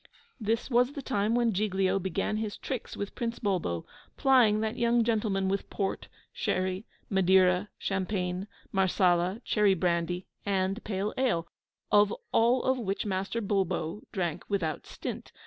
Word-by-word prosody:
This 225 +4 -1
was 245 +3 +3
the 280 - -6
time 215 -2 +1
when 235 -2 +2
Giglio 195 -1 +1
began 190 +3 -1
his 215 -1 -3
tricks 260 -4 -5
with 200 - -4
Prince 235 -1 -3
Bulbo, 180 - -1 0.3
plying 245 -6 +5
that 220 +1 -1
young 235 0 +3
gentleman 210 -4 +1
with 195 +1 -1
port, 195 -2 -2 0.3
sherry, 185 +2 -1 0.2
madeira, 190 0 +4
champagne, 185 -1 -2 0.2
marsala, 185 +2 +2
cherry 205 -3 +3
brandy, 175 0 0 0.2
and 195 +2 0
pale 205 0 -2
ale, 170 -11 +1 0.4
of 205 0 +5 0.2
all 240 +3 +3
of 260 0 +1
which 200 -3 -2
Master 195 +3 -2
Bulbo 190 -2 -1
drank 175 -4 -2
without 180 -7 -1
stint. - - -6
200 Hz, 140 wpm, -29 LUFS, 185-225 Hz, 0.4 s, plying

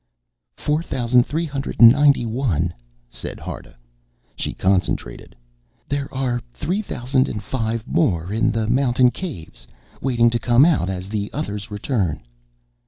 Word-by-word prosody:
"Four 150 +2 0
thousand 125 -5 +2
three 160 +4 -1
hundred 140 -3 -5
and 115 -1 +10
ninety 140 -2 +4
one," 110 - -1 0.3
said - - -7
Harta. - - -8 0.6
She - - -4
concentrated. 95 -10 -1 0.5
"There 140 0 -3
are 125 -2 -1
three 190 +6 -1
thousand 130 - 0
and 105 -1 -5
five 115 -2 -2
more 95 - 0
in 110 - +2
the 110 -1 -1
mountain 125 0 +3
caves, 85 - -8 0.3
waiting 120 -3 +3
to 120 - 0
come 120 +4 +5
out 145 - +2
as 95 0 -4
the 105 -1 -3
others 100 +1 -4
return." 105 - -2
120 Hz, 140 wpm, -21 LUFS, 105-135 Hz, 0.6 s, and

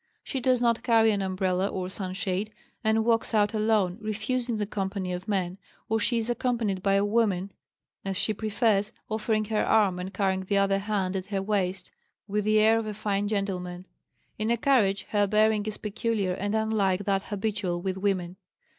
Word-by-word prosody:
She 270 - -3
does 255 -1 +2
not 235 -1 +2
carry 225 -2 +4
an 200 -1 0
umbrella 185 0 0
or 185 -2 -3
sunshade, 190 +2 -3 0.3
and 220 0 +2
walks 230 -1 +1
out 210 0 +3
alone, 215 -3 +1
refusing 225 +3 -2
the 210 - -1
company 190 -2 -3
of 180 +3 -6
men; 190 -2 -1 0.3
or 225 0 +2
she 235 +3 +1
is 225 -1 -1
accompanied 235 -5 -1
by 195 +1 +2
a 200 +1 +3
woman, 205 -3 +1 0.5
as 195 -1 -2
she 215 - +1
prefers, 215 -1 +1 0.2
offering 215 0 0
her 215 0 0
arm 200 -5 +3
and 185 +1 -5
carrying 190 -1 0
the 190 +2 -1
other 195 0 +3
hand 195 -2 -1
at 185 -1 -3
her 195 -1 -2
waist, 190 -3 -1 0.4
with 210 0 -1
the 215 0 +3
air 220 +1 +5
of 225 - -4
a 210 - -4
fine 205 -1 -1
gentleman. 185 -3 -3 0.5
In 215 +1 0
a 235 - +2
carriage 215 -7 +2
her 205 -1 +2
bearing 215 0 +2
is 215 - -4
peculiar 210 -2 -1
and 205 +3 -2
unlike 205 -3 +1
that 195 -1 +1
habitual 200 -3 -2
with 190 +1 -2
women. 190 -2 -1
205 Hz, 185 wpm, -27 LUFS, 190-220 Hz, 0.5 s, air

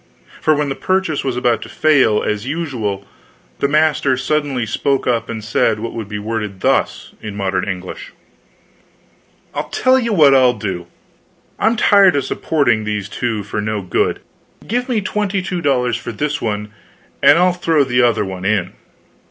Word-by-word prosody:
For 155 - +3
when 145 -1 -1
the - - -1
purchase 185 -1 -1
was 130 -2 -2
about 120 -2 +1
to - - -8
fail, 140 -9 +3
as 105 +3 -2
usual, 125 -11 -3 0.5
the 140 - +2
master 150 -3 +2
suddenly 135 -2 -1
spoke 135 +5 0
up 115 -2 0
and 110 -2 -5
said 110 -1 +1
what 115 +1 -5
would 110 -3 -5
be 105 - -4
worded 105 -2 -4
thus - - 0
in 105 -2 -7
modern 95 -1 -1
English: 90 -1 -6 1.4
"I'll - - -4
tell 260 0 +3
you 235 -2 -1
what 150 -8 +6
I'll 125 -3 +4
do. 95 -4 -4 0.7
I'm 225 +1 +2
tired 195 -7 +5
supporting 120 -9 0
these 105 -2 -3
two 110 -2 -2
for 105 +2 -4
no 105 -1 -3
good. 90 - 0 0.4
Give 245 +4 -2
me 230 -4 +1
twenty 205 0 -1
two 180 -2 -3
dollars 125 -5 +1
for 120 - -6
this 150 +7 -2
one, 105 -1 -3 0.5
and 145 +3 +7
I'll 180 +1 +3
throw 165 -4 +2
the 125 -1 +1
other 120 -3 +2
one 95 -1 -6
in." 95 -3 0
125 Hz, 170 wpm, -18 LUFS, 105-155 Hz, 1.4 s, and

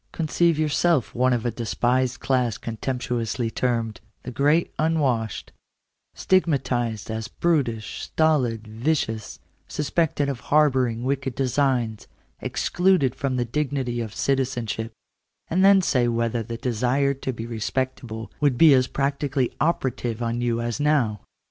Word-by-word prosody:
Conceive 165 0 +1
yourself 155 -2 +1
one 130 +1 +2
of 120 -2 0
a 120 - +1
despised 120 +2 0
class 125 -4 0
contemptuously 120 0 -3
termed 115 -3 -1
" - - -44
the 125 - -6
great 150 +6 +2
unwashed; 140 - 0 0.3
" - - -55
stigmatized 130 - 0
as 110 0 -3
brutish, 130 -10 -1
stolid, 125 -9 +1
vicious; 110 -1 -2 0.3
suspected 150 -1 0
of 135 -3 -3
harbouring 130 -6 +2
wicked 135 -1 -2
designs; 125 -4 0 0.3
excluded 180 -8 +1
from 135 -3 -2
the 125 -1 0
dignity 130 -2 -2
of 110 -2 -5
citizenship; 120 -5 -1 0.6
and 185 +3 +3
then 195 -1 +6
say 125 -7 +2
whether 115 0 0
the 115 +1 -5
desire 125 +4 +1
to 135 -1 -4
be 115 -2 -6
respectable 115 0 -3
would 145 -4 +2
be 160 -1 +7
as 130 -1 +4
practically 140 -2 -1
operative 125 -7 0
on 115 +1 -1
you 120 -1 0
as 120 +2 -3
now. 135 -9 +1
125 Hz, 135 wpm, -24 LUFS, 115-145 Hz, 0.6 s, be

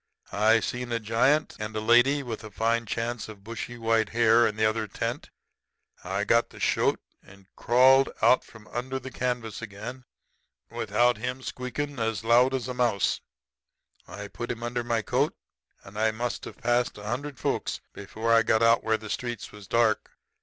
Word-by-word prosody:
I 110 +3 +4
seen 125 +3 -4
a 115 - 0
giant 120 +8 +2
and 105 0 -5
a - - 0
lady 120 +6 +4
with 115 -4 -6
a 110 - -8
fine 115 +3 0
chance 115 0 -3
of 100 -2 -11
bushy 115 +2 -6
white 115 -2 +1
hair 115 0 +4
in 105 - -3
the 110 0 +1
other 110 0 0
tent. - - -4 0.7
I 95 +2 -2
got 115 +2 +3
the - - -14
shoat - - +1 0.2
and 100 0 -18
crawled 130 +3 +5
out 125 - +5
from 110 -1 -16
under 130 +3 -3
the 130 0 -8
canvas 120 -5 -3
again 115 +4 -8 0.7
without 120 +3 +2
him 125 +3 -4
squeakin' 130 +3 -4
as 115 -2 -1
loud 125 +3 +4
as 125 -2 -3
a 125 - -3
mouse. 120 -5 +1 0.9
I 105 0 -7
put 120 +4 -7
him 115 0 -4
under 120 0 -2
my 115 -2 0
coat, 135 +7 0 0.5
and 100 +2 -9
I 110 0 +3
must 120 +2 -3
have - - -9
passed 120 0 0
a 105 - -10
hundred 130 +6 -4
folks - - -2
before 110 +3 -2
I 115 - +6
got 110 0 +2
out 115 0 +4
where 110 0 +1
the 110 - -10
streets 120 0 -4
was 105 -2 -12
dark. 115 -2 +2
115 Hz, 180 wpm, -27 LUFS, 110-125 Hz, 0.9 s, I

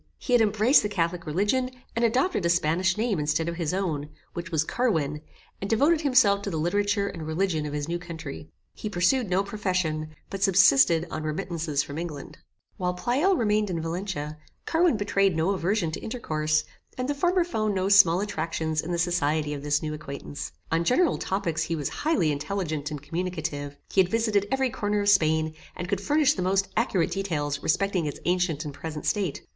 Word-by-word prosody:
He 250 - -3
had 240 - +6
embraced 215 +5 +4
the 210 - -2
catholic 170 -3 -1
religion, 210 +11 +1 0.3
and 230 - 0
adopted 250 - +2
a 170 - +2
Spanish 175 +3 +2
name 220 -5 0
instead 150 +2 0
of 170 0 -3
his 165 -4 -1
own, 165 -6 -2 0.2
which 170 0 -5
was 160 -2 +2
CARWIN, 160 - 0 0.4
and 195 - -3
devoted 295 +8 +3
himself 235 -9 +4
to 200 - -4
the 165 - -3
literature 200 +5 +1
and 165 -5 -6
religion 160 -2 0
of 145 - -6
his 145 0 -3
new 170 +1 -2
country. 160 -4 -8 0.2
He 215 - -5
pursued 205 +5 +1
no 185 +2 +2
profession, 180 -7 -2 0.2
but 195 - -5
subsisted 170 -4 +5
on - - -3
remittances 155 -2 -2
from 145 +2 -6
England. 155 -5 -7 0.4
While 180 -2 -1
Pleyel 275 - +2
remained 210 -2 +1
in 170 -2 -2
Valencia, 165 -3 -4 0.3
Carwin 330 -6 +3
betrayed 195 -2 +1
no 165 +4 +2
aversion 190 -2 0
to - - -5
intercourse, 155 -10 -1 0.3
and 255 0 -2
the 290 - 0
former 355 +5 +2
found 215 - -1
no 190 0 0
small 195 -3 +6
attractions 160 -5 -2
in 170 - -5
the 175 - 0
society 155 -3 0
of 145 - -5
this 145 +1 0
new 155 0 -3
acquaintance. 145 -1 -7 0.2
On 165 +1 +2
general 270 - +2
topics 175 -4 -1
he 165 +1 -1
was 145 -3 -2
highly 295 - +1
intelligent 150 -1 -3
and 150 -2 -6
communicative. 155 -4 -4
He 195 - +5
had 180 - 0
visited 215 -2 +1
every 265 -1 +1
corner 205 -1 -1
of 205 - +2
Spain, 160 -4 +3 0.2
and 175 - -5
could 195 +1 -1
furnish 295 +5 +3
the - - -4
most 190 +1 +1
accurate 210 -6 +1
details 150 -7 -2
respecting 190 -2 +1
its 145 - -5
ancient 175 -4 0
and 145 - -5
present 150 +1 -6
state. 195 -8 -1
180 Hz, 190 wpm, -26 LUFS, 155-205 Hz, 0.4 s, had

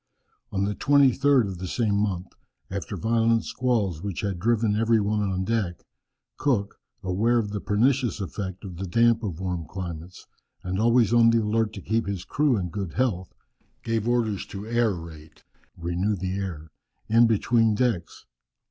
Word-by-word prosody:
On 95 0 0
the 105 - -1
23rd 140 0 +4
of 95 -2 -6
the 95 - -4
same 110 +2 0
month, 100 -3 -1 0.4
after - - -4
violent 115 0 +2
squalls 110 -10 -1
which 100 -3 -4
had 100 -4 -2
driven 110 +1 +2
every 115 +1 +3
one 105 +1 0
on 95 -2 -1
deck, 100 -5 -2 0.5
Cook, 115 -9 0 0.2
aware 105 +6 +2
of 105 -3 -1
the 105 -1 -3
pernicious 120 +4 +1
effect 95 +1 -5
of 90 -3 -8
the 95 +1 -4
damp 115 +4 +3
of 95 -7 -4
warm 90 -4 -3
climates, 90 -1 -7 0.4
and 95 +1 -2
always 115 -1 +3
on 115 -1 +6
the 115 -1 +3
alert 110 0 +1
to 100 - -7
keep 110 0 0
his 95 -2 -4
crew 145 -5 +2
in 90 -3 -2
good 95 -2 -5
health, 100 -8 -1 0.5
gave 115 -1 -1
orders 115 -5 0
to 100 - -7
aerate 85 -10 -3 0.3
(renew 90 +5 -1
the 95 0 -3
air) 85 -6 -5 0.4
in 115 +2 +5
the 115 - +3
between 115 0 +2
decks. 110 -8 -1
105 Hz, 165 wpm, -25 LUFS, 95-115 Hz, 0.5 s, on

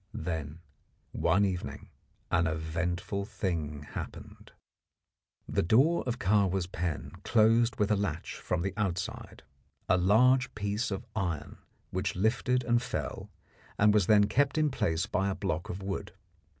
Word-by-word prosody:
Then 80 -2 -4 0.5
one 95 +5 +2
evening 90 -2 -4 0.4
an 85 -1 +3
eventful 85 +5 -2
thing 80 -8 -3
happened. - - -8 1.0
The - - +1
door 135 - +4
of 120 0 -1
Kahwa's 95 -4 +2
pen 85 -3 -4
closed 115 +1 +4
with 105 0 +1
a - - +5
latch 95 -5 -3
from 85 -1 -2
the 95 -1 -2
outside 95 -3 -3 0.4
a 90 - +4
large 125 +8 +4
piece 105 +2 -1
of 100 +3 -4
iron 85 -7 -3 0.3
which 95 +2 -2
lifted 120 +5 +1
and 120 0 +2
fell, 125 - -4 0.5
and 105 0 +5
was 105 -4 +3
then 105 -2 +6
kept 140 +7 +1
in 155 -2 +2
place 80 -9 0
by 95 +1 0
a 95 - -2
block 85 -4 -3
of 95 +2 -5
wood. 95 0 -4
95 Hz, 140 wpm, -30 LUFS, 85-110 Hz, 1.0 s, then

